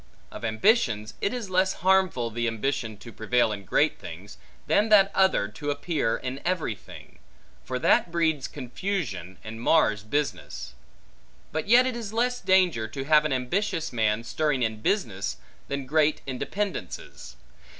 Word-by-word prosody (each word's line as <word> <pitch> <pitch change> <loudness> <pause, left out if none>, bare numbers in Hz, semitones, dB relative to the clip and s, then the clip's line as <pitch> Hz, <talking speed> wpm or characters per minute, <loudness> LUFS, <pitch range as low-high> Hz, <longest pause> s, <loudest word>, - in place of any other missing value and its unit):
Of - - -9
ambitions, 110 - +2
it 200 - +1
is 235 -6 -5
less 185 +1 +3
harmful, 185 -11 +3
the 120 +1 -1
ambition 115 -1 -2
to 110 +4 -11
prevail 115 +1 +1
in 100 -1 -5
great - - +2
things, - - -10 0.3
than 210 +2 +2
that 200 -2 +6
other, 190 0 +3
to 150 -2 -5
appear 145 -4 0
in 130 +1 -5
every 175 -10 0
thing; 110 +1 -14 0.4
for 125 - -3
that 165 - +3
breeds 160 -4 +1
confusion, 130 - -4
and 110 +1 -7
mars 115 -7 +3
business. 140 - -3 0.8
But 155 +3 -3
yet 245 +4 +6
it 255 -2 -1
is 220 -3 -6
less 245 +2 0
danger, 180 -12 +3
to 135 +5 -5
have 150 +1 +4
an 150 - 0
ambitious 165 +6 -1
man 110 -1 +1
stirring 145 +1 0
in 110 -1 -2
business, 110 - -1 0.3
than 140 -1 -3
great 155 +2 +2
in 130 -2 -5
dependences. 200 - -5
145 Hz, 155 wpm, -26 LUFS, 115-190 Hz, 0.8 s, that